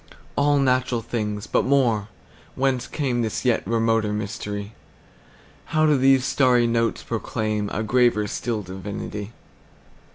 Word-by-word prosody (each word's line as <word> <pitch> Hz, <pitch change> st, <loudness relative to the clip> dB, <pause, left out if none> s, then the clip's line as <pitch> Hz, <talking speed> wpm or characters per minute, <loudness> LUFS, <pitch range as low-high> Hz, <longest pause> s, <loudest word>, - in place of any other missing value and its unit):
All 145 Hz, 0 st, +3 dB
natural 130 Hz, -3 st, +1 dB
things! 105 Hz, -3 st, -3 dB
But -, -, +1 dB
more—Whence 125 Hz, +1 st, -1 dB
cameThis 120 Hz, -7 st, -2 dB
yet 125 Hz, -2 st, +3 dB
remoter 115 Hz, -2 st, +1 dB
mystery? 105 Hz, 0 st, -4 dB, 1.0 s
How 155 Hz, -, +5 dB
do 150 Hz, -1 st, +4 dB
these 135 Hz, -1 st, +4 dB
starry 125 Hz, -4 st, +3 dB
notes 115 Hz, -1 st, 0 dB
proclaimA 110 Hz, -2 st, -2 dB
graver 120 Hz, -2 st, +3 dB
still 110 Hz, +1 st, -3 dB
divinity? 100 Hz, +2 st, -6 dB
115 Hz, 105 wpm, -23 LUFS, 105-130 Hz, 1.0 s, How